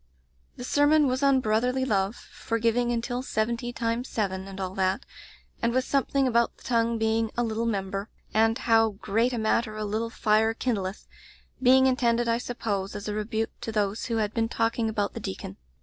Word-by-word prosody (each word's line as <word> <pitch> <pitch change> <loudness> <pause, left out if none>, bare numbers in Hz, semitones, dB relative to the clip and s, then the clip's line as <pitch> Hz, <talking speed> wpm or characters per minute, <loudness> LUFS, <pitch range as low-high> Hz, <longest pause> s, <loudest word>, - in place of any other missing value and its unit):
"The - - -8
sermon 290 +3 +4
was 260 0 0
on 275 -2 +4
brotherly 250 +4 +1
love 200 -1 -1
— - - -15
^for 230 0 +1
giving 235 +2 +1
until 240 +1 -2
seventy 235 0 -2
times 235 +1 -2
seven, 190 -3 -2
and 195 0 -8
all 185 -1 -3
that, 190 +5 0 0.6
and 235 - +2
with 255 0 +1
something 275 -1 +1
about 235 -1 +1
the - - -19
tongue 230 -1 +1
being 225 0 +1
a 240 - +2
'little 230 0 -1
member* 195 -1 -2 0.2
and 225 +1 +3
'how 225 -3 +3
great 225 +5 0
a 245 - -2
matter 220 0 0
a 215 - -3
litde 220 +2 -2
fire 220 +1 +2
kindleth* 205 -6 -2 0.3
— - - -20
^being 260 +1 +6
intended, 240 -2 +2
I 230 0 +2
sup 245 0 -6
pose, 200 -2 -2
as 205 0 -6
a 210 - -2
rebuke 220 +1 -2
to 225 - -4
those 210 0 -1
who 230 -2 -1
had 215 -1 -1
been 225 -1 0
talking 225 0 0
about 205 -2 -1
the - - -5
deacon. 95 0 -6
225 Hz, 200 wpm, -27 LUFS, 215-245 Hz, 0.6 s, ^being